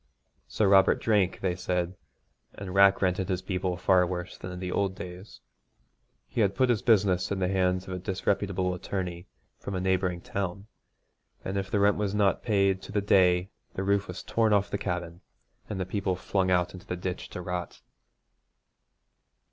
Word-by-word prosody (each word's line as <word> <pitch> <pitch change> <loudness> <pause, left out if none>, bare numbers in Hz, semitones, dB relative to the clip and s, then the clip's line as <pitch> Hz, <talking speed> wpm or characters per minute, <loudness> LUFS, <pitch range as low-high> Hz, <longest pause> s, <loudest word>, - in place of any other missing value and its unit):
Sir 105 - +1
Robert 95 0 +5
drank, 105 -4 +1
they 90 -2 0
said, 90 +1 -2 0.6
and 95 -2 -7
rack 100 0 +5
rented 95 +1 0
his 95 -1 -1
people 90 -2 -2
far 90 0 +4
worse 90 0 -5
than 90 - -8
in 90 - -7
the 90 -1 -4
old 100 -2 0
days. 90 +3 -9 0.9
He 115 - -1
had 100 -2 +2
put 130 0 +2
his 115 -5 +2
business 95 -5 +3
in 100 - 0
the 95 -1 0
hands 90 0 0
of 95 - -5
a 90 - -3
disreputable 95 0 -1
attorney 90 -1 -4 0.3
from 100 - -5
a - - -1
neighbouring 95 -1 0
town, 95 +1 -4 0.8
and 95 - -3
if 95 -1 -2
the 105 - +1
rent 100 0 +4
was 105 -1 -1
not 100 -2 +2
paid 100 -3 +2
to 95 - -10
the 105 - +1
day 95 -2 +3 0.2
the 95 - -2
roof 100 0 +1
was 90 - -7
torn 110 -2 +2
off 100 -1 +2
the 100 - -2
cabin, 90 -1 -4 0.5
and 105 -3 -4
the 95 - -1
people 95 -1 -1
flung 95 +1 0
out 90 -1 +2
into 90 - -12
the 90 - -3
ditch 90 0 -5
to - - -7
rot. 90 0 -5
95 Hz, 185 wpm, -28 LUFS, 90-100 Hz, 0.9 s, Robert